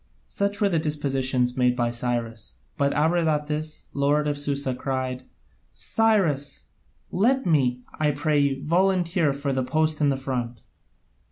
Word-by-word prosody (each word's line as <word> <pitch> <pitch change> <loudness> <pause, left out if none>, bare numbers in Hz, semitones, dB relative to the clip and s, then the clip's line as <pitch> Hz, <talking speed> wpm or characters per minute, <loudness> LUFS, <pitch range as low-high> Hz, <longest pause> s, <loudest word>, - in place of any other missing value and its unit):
Such 200 +1 -2
were 205 - +3
the 170 -4 +1
dispositions 135 -5 0
made 125 -1 +2
by 120 -1 0
Cyrus; 120 -2 -4 0.2
but 140 -2 +1
Abradatas, 155 -1 0
the - - -6
lord 145 +2 +2
of 145 - 0
Susa, 140 -2 -1
cried: 130 0 -3 0.5
"Cyrus, 180 -11 0 0.4
let 255 +8 +2
me, 125 -7 +1 0.2
I 155 -1 +3
pray 145 +1 +1
you, 140 -1 0
volunteer 175 -2 +2
for 140 0 -2
the 130 - 0
post 155 +4 0
in 145 -1 +4
front." 125 -3 -4
145 Hz, 140 wpm, -25 LUFS, 130-155 Hz, 0.5 s, in